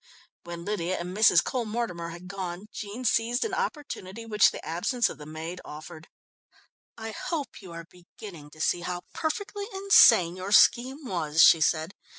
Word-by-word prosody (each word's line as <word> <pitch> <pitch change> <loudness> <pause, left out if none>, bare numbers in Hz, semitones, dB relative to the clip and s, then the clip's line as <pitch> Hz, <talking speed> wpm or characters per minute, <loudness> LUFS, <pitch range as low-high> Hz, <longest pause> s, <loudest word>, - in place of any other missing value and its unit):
When 170 0 -8
Lydia 185 -3 -2
and 180 +2 -6
Mrs. 215 +2 +5
Cole 250 -3 -2
Mortimer 210 -7 -4
had 175 +2 -10
gone, 185 0 -6
Jean 210 +5 -7
seized 235 - +1
an 430 - -4
opportunity 230 - -5
which 210 -2 +4
the - - -9
absence 180 - 0
of - - -10
the 150 - -10
maid 160 +3 -7
offered. 155 +1 -11 0.9
"I 225 -1 -6
hope 295 +3 -5
you 185 -3 -11
are 165 0 -8
beginning 175 -3 -13
to 155 +1 -12
see 175 - +1
how 175 0 -5
perfectly 405 +5 -4
insane 385 - +5
your 185 +2 -4
scheme 265 +7 +4
was," 165 -7 +2
she 165 - +7
said. 160 +3 +1
185 Hz, 165 wpm, -27 LUFS, 170-235 Hz, 0.9 s, she